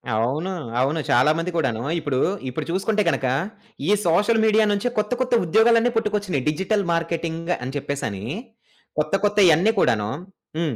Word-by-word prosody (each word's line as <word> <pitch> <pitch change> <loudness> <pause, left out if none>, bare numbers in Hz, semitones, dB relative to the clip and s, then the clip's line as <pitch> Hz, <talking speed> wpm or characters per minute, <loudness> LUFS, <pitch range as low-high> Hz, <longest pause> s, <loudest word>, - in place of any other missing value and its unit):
అవును. 135 +12 -1 0.3
అవును. 140 +5 0
చాలా 125 +5 +4
మంది 165 +2 -2
కూడాను 120 -8 -1 0.2
ఇప్పుడు, 145 -5 -2 0.3
ఇప్పుడు 125 - -4
చూసుకుంటే 195 +4 0
గనక 135 - -1 0.6
ఈ - - +4
సోషల్ 205 +7 +3
మీడియా 220 0 +4
నుంచి 205 +4 0
కొత్త 210 +1 0
కొత్త 255 -1 -1
ఉద్యోగాలన్నీ 230 +6 +4
పుట్టుకొచ్చినాయి. 205 - -1
డిజిటల్ 190 +6 -1
మార్కెటింగ్ 165 0 -2
అని 130 +3 -5
చెప్పేసని 115 -8 -4 0.7
కొత్త 150 0 -1
కొత్తయన్నీ 200 -2 +4
కూడాను 105 - +1 0.5
హ్మ్. 155 -7 -1
165 Hz, 140 wpm, -22 LUFS, 140-210 Hz, 0.7 s, చాలా